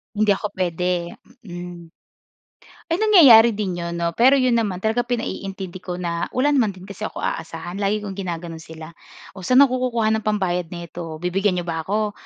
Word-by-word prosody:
Hindi 210 0 +3
ako 205 +2 0
pwede, 180 -1 -1 0.3
mm. 175 -3 -9 1.0
Ay 340 - +1
nangyayari 260 - +7
din 185 -4 -3
'yon, 170 0 -4
'no, 170 0 -1
pero 255 +8 +5
'yon 255 -3 +2
naman 200 -5 -2
talaga 220 +2 +1
pinaiintindi 195 -6 -4
ko 180 -1 -6
na 170 -1 -3
wala 280 +3 +2
naman 250 -7 +3
din 185 - -13
kasi 200 -1 -6
ako - - -11
aasahan 165 +4 -4
lagi 210 +1 0
kong 200 - -5
ginagano'n 170 -3 -5
sila. 160 +1 -11 0.4
O, 190 - -11
sa'n 255 +9 +6
ako 255 -1 -1
kukuha 225 -2 +1
ng - - -16
pambayad 180 -5 0
nito? 170 -1 -7
Bibigyan 190 +1 +1
n'yo 175 - -2
ba 165 -2 -3
ako? 210 +1 0
190 Hz, 180 wpm, -22 LUFS, 175-220 Hz, 1.0 s, nangyayari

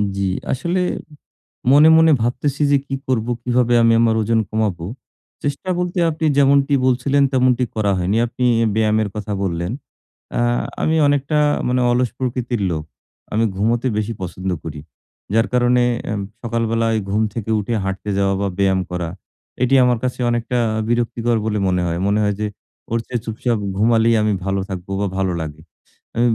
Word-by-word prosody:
জি, 100 - -2 0.3
আসলে 170 +8 -1 0.9
মনে, 150 +3 +7
মনে 160 0 +6
ভাবতেছি 125 +5 -1
যে 140 - +5
কি 135 - -2
করবো 120 -2 0
কিভাবে 125 -1 +2
আমি 115 0 +5
আমার 115 -1 +3
ওজন 115 +1 +1
কমাবো। 100 -6 -1 0.6
চেষ্টা 145 +6 -3
বলতে 180 0 -1
আপনি 160 +1 -3
যেমনটি 140 0 +4
বলছিলেন 135 +2 +2
তেমনটি 130 -1 +3
করা 105 -2 +1
হয়নি। 95 +5 0
আপনি 125 +2 -2 0.3
ব্যায়ামের 110 -1 +2
কথা 105 -1 -4
বললেন। 85 +1 -2 0.7
আ - - +2 0.4
আমি 160 - +2
অনেকটা 145 +1 +1 0.3
মানে 125 0 +1
অলস 125 -1 +2
প্রকৃতির 125 -3 -2
লোক। 80 -1 -3 0.5
আমি 110 +2 +2
ঘুমোতে 115 +5 +1
বেশি 110 +2 -1
পছন্দ 95 +1 -4
করি। 75 -2 -6 0.5
যার 115 +1 +3
কারণে 125 0 +3 0.3
এম 100 -1 -2 0.2
সকালবেলায় 115 -1 0
ঘুম 105 +2 +1
থেকে 110 -2 -5
উঠে 105 +3 -3
হাঁটতে 95 +2 -4
যাওয়া 100 0 +2
বা 100 - 0
ব্যায়াম 95 -1 +3
করা 90 -2 -3 0.5
এটি 130 +2 +3
আমার 125 -1 +2
কাছে 125 0 -2
অনেকটা 120 +1 -1 0.3
বিরক্তিকর 120 0 0
বলে 105 -1 0
মনে 90 -1 +1
হয়। 85 +1 -2
মনে 105 +1 +2
হয় 105 -1 0
যে 105 - 0 0.4
ওর 115 - +1
চেয়ে 120 -2 -2
চুপচাপ 115 0 -1 0.2
ঘুমালেই 115 +1 +3
আমি 105 -1 +1
ভালো 95 0 0
থাকবো 95 0 -6
বা 100 - +1
ভালো 95 -2 0
লাগে। 80 0 -7 0.6
আ - - +2
115 Hz, 160 wpm, -20 LUFS, 100-125 Hz, 0.9 s, মনে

